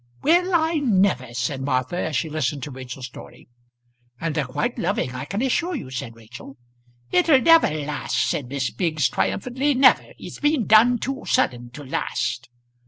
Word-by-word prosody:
"Well 350 +4 +3
I 320 0 +2
never!" 190 - +1
said 125 +3 -2
Martha, 130 +2 -1
as 160 -4 -2
she 140 +5 0
listened 150 -3 -2
to 150 - -6
Rachel's 130 0 -8
story. 125 - -13 0.7
"And 165 -1 -2
they're 150 -2 -1
quite 240 - -3
loving 175 -7 -1
I 125 +2 -5
can 200 - -3
assure 340 +7 0
you," 175 - -7
said 120 -3 -6
Rachel. 125 +4 -12 0.5
"It'll 325 -6 +4
never 330 +5 +5
last," 150 -1 -3
said 140 - -2
Miss 135 0 -2
Biggs 155 -7 0
triumphantly 260 - -1
"never. 265 - +4
It's - - -10
been 295 -5 +1
done 235 +3 +5
too 270 +4 -4
sudden 120 - 0
to 145 - -9
last." 130 -3 -3
155 Hz, 170 wpm, -23 LUFS, -, 0.7 s, never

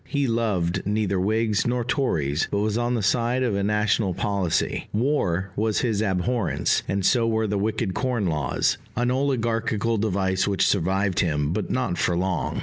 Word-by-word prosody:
He 140 -2 0
loved 105 -7 0
neither 105 -2 0
whigs 110 +2 +1
nor 120 0 0
tories, 85 - 0
but - - -1
was 105 +1 0
on 120 +1 0
the 110 - -1
side 120 +5 +1
of 120 -4 0
a 100 - 0
national 105 -2 +1
policy: 100 -5 -1
war 100 - 0
was 110 0 0
his 110 -4 0
abhorrence, 105 +2 0
and 100 -1 -1
so 115 0 +3
were 110 -1 +1
the 105 -1 -1
wicked 105 -1 -1
corn 125 -1 -1
laws 75 -5 0 0.2
an 120 +1 +1
oligarchical 115 -4 0
device 95 -2 0
which 100 -2 +2
survived 95 0 +1
him, 75 -2 0
but 105 +1 -3
not 125 -9 -1
for 85 - +1
long. 90 -1 -1
105 Hz, 170 wpm, -24 LUFS, 95-115 Hz, 0.2 s, so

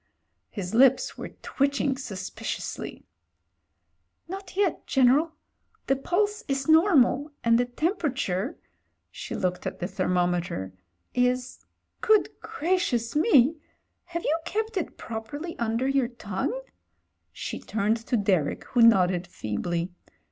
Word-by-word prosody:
His 195 -2 -5
lips 260 +2 +4
were - - -6
twitching 280 0 +1
suspiciously. 195 -8 -5 1.2
"Not 385 +1 -8
yet, 395 -5 0
General. 270 +5 +4 0.5
The 270 - +2
pulse 415 +10 0
is 270 -1 -1
normal 310 -4 +4
— - - -46
and 230 0 +4
the 245 - +2
temperature" 260 - -1 0.3
— - - -49
she - - -6
looked 180 -1 -1
at - - -4
the 175 - -3
thermometer 175 - -1 0.2
— 85 0 -47 0.2
"is 250 0 -4 0.2
— - - -49
good 430 - +5
gracious 295 -9 -1
me! 305 - +5 0.5
have 340 -1 -5
you 320 +3 +1
kept 440 +4 -2
it 365 - -3
properly 260 +10 -6
under 230 +2 0
your 270 -2 +2
tongue?" 235 - -3 0.7
She - - -5
turned 215 +1 0
to 245 - +2
Derek, 190 -8 +1
who 245 - +2
nodded 185 -6 +5
feebly. 170 - -3
250 Hz, 125 wpm, -26 LUFS, 195-315 Hz, 1.2 s, good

